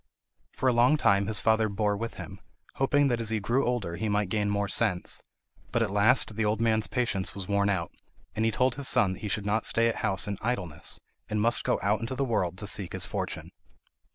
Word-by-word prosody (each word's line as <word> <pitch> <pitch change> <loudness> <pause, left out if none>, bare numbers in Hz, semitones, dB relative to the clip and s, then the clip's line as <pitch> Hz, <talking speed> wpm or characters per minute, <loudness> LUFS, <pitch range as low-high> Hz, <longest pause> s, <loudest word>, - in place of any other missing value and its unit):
For 130 - -2
a 125 - +4
long 125 +6 +4
time 100 -7 +2
his 110 -2 +3
father 110 -1 +2
bore 105 0 0
with 115 +2 -5
him, - - -9 0.4
hoping 145 +1 +3
that 120 -2 0
as 110 - -3
he 110 -1 0
grew 120 +6 +1
older 100 -9 -2
he 110 +4 -2
might 105 -2 0
gain 105 0 0
more 100 0 0
sense; 100 -4 -1 0.5
but - - +1
at - - -2
last 105 +2 +3
the 110 - 0
old 105 +1 0
man's 110 -2 +1
patience 120 -7 -2
was 95 -2 -6
worn 100 0 +1
out, 90 -4 -1 0.4
and 110 - 0
he 115 - +3
told 125 +3 +1
his 140 -2 -1
son 105 -7 +3
that - - -10
he 105 - -5
should 100 0 -1
not 105 +2 0
stay 115 0 +3
at 115 - -1
house 95 +1 0
in 100 -1 -4
idleness, 100 -10 -2 0.3
and 105 - -1
must 115 +3 +2
go - - 0
out 105 +2 +2
into 115 +3 -4
the 135 +1 0
world 95 -7 -1
to 105 - -4
seek 100 -3 -2
his - - +1
fortune. - - -5
105 Hz, 235 wpm, -28 LUFS, 100-115 Hz, 0.5 s, a